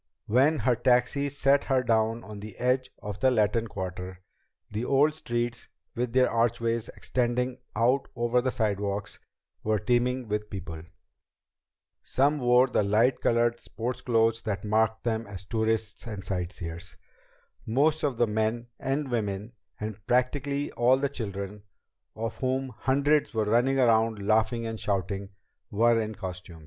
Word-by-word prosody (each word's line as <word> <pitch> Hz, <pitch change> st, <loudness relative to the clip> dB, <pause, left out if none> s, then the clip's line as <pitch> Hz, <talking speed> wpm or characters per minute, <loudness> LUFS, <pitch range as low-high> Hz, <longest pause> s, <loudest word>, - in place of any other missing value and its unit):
When 135 Hz, +8 st, +3 dB
her 125 Hz, -3 st, +2 dB
taxi 125 Hz, +3 st, +2 dB
set 140 Hz, 0 st, +2 dB
her 130 Hz, -2 st, +2 dB
down 115 Hz, 0 st, +1 dB
on 105 Hz, -1 st, -9 dB
the 105 Hz, -1 st, -9 dB
edge 130 Hz, +1 st, +1 dB
of 105 Hz, -1 st, -5 dB
the 130 Hz, -, +4 dB
Latin 115 Hz, -1 st, +2 dB
Quarter, 95 Hz, -2 st, -6 dB, 0.5 s
the 105 Hz, +3 st, -2 dB
old 140 Hz, +4 st, +3 dB
streets, 120 Hz, -5 st, -3 dB, 0.3 s
with 125 Hz, -2 st, -2 dB
their 130 Hz, 0 st, +5 dB
archways 115 Hz, 0 st, 0 dB
extending 125 Hz, +1 st, -1 dB, 0.2 s
out 125 Hz, +5 st, +2 dB
over 120 Hz, +1 st, +2 dB
the 130 Hz, -, 0 dB
sidewalks, 100 Hz, -2 st, -2 dB, 0.4 s
were 110 Hz, 0 st, +2 dB
teeming 125 Hz, +3 st, 0 dB
with 105 Hz, 0 st, -2 dB
people. 90 Hz, -5 st, -6 dB, 1.2 s
Some 145 Hz, +3 st, +1 dB
wore 125 Hz, 0 st, +5 dB
the 125 Hz, -, +1 dB
light 110 Hz, +5 st, +2 dB
colored 120 Hz, 0 st, +2 dB
sports 120 Hz, +2 st, -4 dB
clothes 115 Hz, -1 st, +2 dB
that 100 Hz, -4 st, -3 dB
marked 110 Hz, +1 st, +1 dB
them 115 Hz, -1 st, -1 dB
as 95 Hz, -2 st, -8 dB
tourists 110 Hz, 0 st, -1 dB
and 105 Hz, -4 st, -6 dB
sight 90 Hz, -1 st, -3 dB
seers. 85 Hz, -2 st, -8 dB, 0.7 s
Most 145 Hz, +7 st, +2 dB
of 140 Hz, -5 st, 0 dB
the 120 Hz, -, +4 dB
men 110 Hz, +2 st, -1 dB
and 135 Hz, 0 st, -2 dB
women, 105 Hz, -1 st, -2 dB, 0.3 s
and 105 Hz, -1 st, -6 dB
practically 140 Hz, +3 st, 0 dB
all 125 Hz, +2 st, +4 dB
the 140 Hz, +1 st, 0 dB
children 100 Hz, -5 st, -5 dB, 0.5 s
of 115 Hz, +1 st, -4 dB
whom 130 Hz, 0 st, -1 dB
hundreds 140 Hz, +3 st, +1 dB
were 110 Hz, -1 st, +1 dB
running 120 Hz, +5 st, +3 dB
around 115 Hz, -2 st, +3 dB
laughing 110 Hz, +3 st, +1 dB
and 115 Hz, -1 st, -4 dB
shouting 100 Hz, 0 st, -2 dB, 0.4 s
were 115 Hz, +1 st, +3 dB
in 110 Hz, 0 st, -4 dB
costume. 90 Hz, -4 st, -7 dB
115 Hz, 150 wpm, -28 LUFS, 105-125 Hz, 1.2 s, their